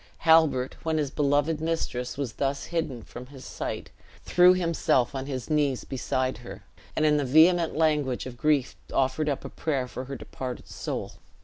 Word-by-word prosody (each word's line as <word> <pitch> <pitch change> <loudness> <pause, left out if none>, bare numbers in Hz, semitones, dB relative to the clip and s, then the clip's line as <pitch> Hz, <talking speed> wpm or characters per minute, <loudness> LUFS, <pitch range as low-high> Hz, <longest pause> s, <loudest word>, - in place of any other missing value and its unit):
Halbert, 160 -6 +4
when 160 -1 -1
his 145 -3 -1
beloved 145 +2 +1
mistress 160 -7 -2
was 135 -6 -3
thus 140 0 -2
hidden 135 -9 -2
from 125 +1 -10
his 135 -1 -12
sight, - - -5 0.3
threw 180 +1 +6
himself 165 -8 +1
on 135 0 -4
his 130 -4 -4
knees 145 -4 +1
beside 130 0 -2
her, - - -10 0.3
and 155 - +2
in 150 -1 +4
the 145 - +1
vehement 160 +5 +4
language 150 -5 +1
of 130 -1 -7
grief 145 0 +1 0.2
offered 135 +3 +1
up 140 - -3
a - - -5
prayer 135 -5 -2
for 130 +1 -6
her 135 +1 -6
departed 125 0 -7
soul. - - -5
140 Hz, 175 wpm, -27 LUFS, 130-155 Hz, 0.3 s, threw